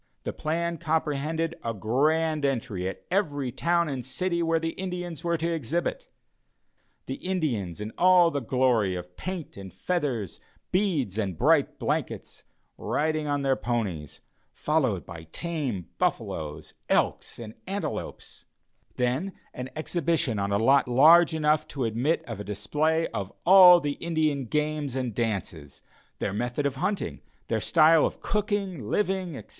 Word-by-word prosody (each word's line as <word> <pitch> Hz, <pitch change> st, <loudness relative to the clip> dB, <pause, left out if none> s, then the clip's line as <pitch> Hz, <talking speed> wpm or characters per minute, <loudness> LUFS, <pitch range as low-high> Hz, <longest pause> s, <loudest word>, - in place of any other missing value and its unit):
The -, -, -3 dB
plan 170 Hz, +1 st, -2 dB
comprehended 160 Hz, 0 st, -1 dB
a 115 Hz, -1 st, -2 dB
grand 150 Hz, +8 st, +1 dB
entry 120 Hz, -9 st, -1 dB
at 95 Hz, -, -7 dB
every 145 Hz, -9 st, 0 dB
town 170 Hz, +5 st, +1 dB
and 135 Hz, -4 st, -3 dB
city 170 Hz, +7 st, -1 dB
where 165 Hz, 0 st, +2 dB
the 165 Hz, 0 st, -2 dB
Indians 180 Hz, -3 st, -5 dB
were 170 Hz, -1 st, +1 dB
to 165 Hz, +1 st, -1 dB
exhibit 165 Hz, +3 st, -3 dB, 0.9 s
the 130 Hz, -, -4 dB
Indians 130 Hz, -, -2 dB
in 105 Hz, +1 st, -5 dB
all 180 Hz, -1 st, +6 dB
the 145 Hz, -, -1 dB
glory 120 Hz, -6 st, +1 dB
of 90 Hz, 0 st, -8 dB
paint 185 Hz, -, -6 dB
and 95 Hz, -1 st, -8 dB
feathers, 135 Hz, -, -2 dB, 0.3 s
beads 155 Hz, -, 0 dB
and 95 Hz, -6 st, -2 dB
bright -, -, +3 dB
blankets, -, -, -3 dB, 0.4 s
riding 155 Hz, 0 st, -1 dB
on 145 Hz, -1 st, 0 dB
their 135 Hz, -1 st, +3 dB
ponies, 100 Hz, -, -3 dB, 0.3 s
followed 130 Hz, -, 0 dB
by 85 Hz, -2 st, -9 dB
tame 140 Hz, -, -3 dB
buffaloes, 75 Hz, -1 st, -2 dB, 0.2 s
elks -, -, 0 dB
and 110 Hz, -2 st, -8 dB
antelopes; 200 Hz, +2 st, -5 dB, 0.5 s
then 130 Hz, +10 st, -1 dB, 0.2 s
an 125 Hz, +1 st, -6 dB
exhibition 155 Hz, -, 0 dB
on 100 Hz, 0 st, -1 dB
a 100 Hz, -, +3 dB
lot 135 Hz, +6 st, +4 dB
large 160 Hz, +7 st, +6 dB
enough 155 Hz, 0 st, +2 dB
to 135 Hz, -5 st, -3 dB
admit 120 Hz, +9 st, 0 dB
of 115 Hz, -5 st, -6 dB
a -, -, -4 dB
display 150 Hz, -, 0 dB
of 100 Hz, -1 st, -4 dB
all 180 Hz, -1 st, +9 dB
the 145 Hz, -3 st, -3 dB
Indian 155 Hz, -5 st, 0 dB
games 150 Hz, 0 st, -1 dB
and 125 Hz, -3 st, -2 dB
dances, 95 Hz, -, -4 dB, 0.3 s
their -, -, -2 dB
method 120 Hz, +6 st, -2 dB
of 140 Hz, -1 st, -1 dB
hunting, 200 Hz, +8 st, -2 dB, 0.3 s
their -, -, 0 dB
style 160 Hz, -1 st, +5 dB
of -, -, -1 dB
cooking, 200 Hz, -, -2 dB
living, 190 Hz, -6 st, -1 dB
etc. -, -, -11 dB
145 Hz, 145 wpm, -27 LUFS, 115-170 Hz, 0.9 s, all